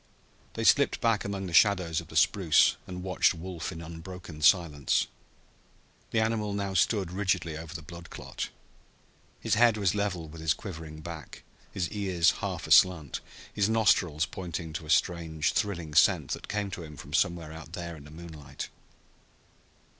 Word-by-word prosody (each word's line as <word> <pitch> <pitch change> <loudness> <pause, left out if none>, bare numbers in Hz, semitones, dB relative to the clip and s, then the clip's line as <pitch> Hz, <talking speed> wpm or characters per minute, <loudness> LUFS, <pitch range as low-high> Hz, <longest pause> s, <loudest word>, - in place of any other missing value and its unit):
They - - -2
slipped - - +4
back 115 -3 +2
among 100 -1 -3
the 90 - -6
shadows 85 -3 +4
of 85 - -14
the 80 - -12
spruce 80 0 +4
and 90 -1 -6
watched 90 -2 +2
Wolf 85 +1 -5
in 85 -2 -8
unbroken 85 -1 -9
silence. 75 -3 +3 1.0
The 115 - +1
animal 110 -2 0
now 100 -1 -2
stood 95 -1 +2
rigidly 90 -4 0
over 80 +2 -8
the 80 - -6
blood 85 +3 -10
clot. - - -6 0.9
His - - 0
head 115 -1 +5
was 100 -3 +2
level 100 -5 -2
with 80 +1 -10
his 80 -2 +2
quivering 80 -6 -8
back, 80 -4 -9 0.3
his 90 -3 -1
ears 95 -5 +2
half - - -3
aslant, 85 -6 +4 0.3
his 100 0 +1
nostrils 90 -8 +3
pointing 85 -3 -6
to 80 -1 -6
a - - -12
strange 80 -2 +1
thrilling 85 -7 -2
scent - - +4
that - - -4
came 105 -1 -2
to 90 - -5
him 75 -3 -10
from 70 - -10
somewhere 85 0 +1
out 80 0 -10
there 85 -1 -5
in 75 -2 -13
the - - -12
moonlight. 80 -3 -8
85 Hz, 165 wpm, -29 LUFS, 80-95 Hz, 1.0 s, head